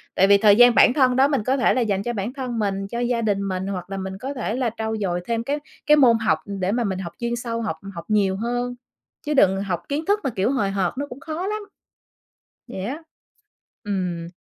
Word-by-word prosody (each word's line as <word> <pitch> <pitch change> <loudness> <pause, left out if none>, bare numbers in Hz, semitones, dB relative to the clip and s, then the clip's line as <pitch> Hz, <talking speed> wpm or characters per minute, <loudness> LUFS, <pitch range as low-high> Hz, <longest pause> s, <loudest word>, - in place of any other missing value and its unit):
Tại 195 - +4
vì 200 0 +7
thời 205 0 +6
gian 245 +1 +7
bản - - +6
thân 255 -3 +3
đó 265 +2 +5
mình 275 -6 0
có 260 +4 +1
thể 255 - +3
là 255 - +1
dành 200 -4 0
cho 240 - -2
bản 215 +3 -3
thân 255 -4 -4
mình, 195 -2 -1
cho 235 +3 -4
gia 240 -1 0
đình 200 -3 0
mình 185 0 -3
hoặc 185 -2 -5
là 195 - -4
mình 190 0 -5
có 265 +7 -5
thể 240 -4 -3
là 250 -2 0
trau 220 0 -2
dồi 180 -4 -1
thêm 230 +1 -1
cái 285 +4 -2 0.3
cái 300 - +6
môn 245 -5 +6
học, 205 -8 +1
ừ, 200 - -6
để 185 +1 +1
mà 240 +2 0
mình 190 -3 -2
học 170 -3 -6
chuyên 235 0 -1
sâu, 230 -1 -3
học 210 -8 -3 0.2
học 170 -1 -8
nhiều 200 -3 +2
hơn, 245 +2 -2 0.5
chứ 300 - 0
đừng 195 -8 +4
học 180 -4 -2
kiến 295 +3 -2
thức 410 +2 +2
mà, - - 0
kiểu, 205 +1 0
hời 205 -8 0
hợt 190 -3 0
nó 285 +1 -3
cũng 245 - -9
khó 320 +5 -4
lắm. 425 +1 -2 1.1
Vậy 190 - -5
á. 280 +10 -5 0.8
Ừm. 180 -5 -3
225 Hz, 250 wpm, -23 LUFS, 195-255 Hz, 1.1 s, vì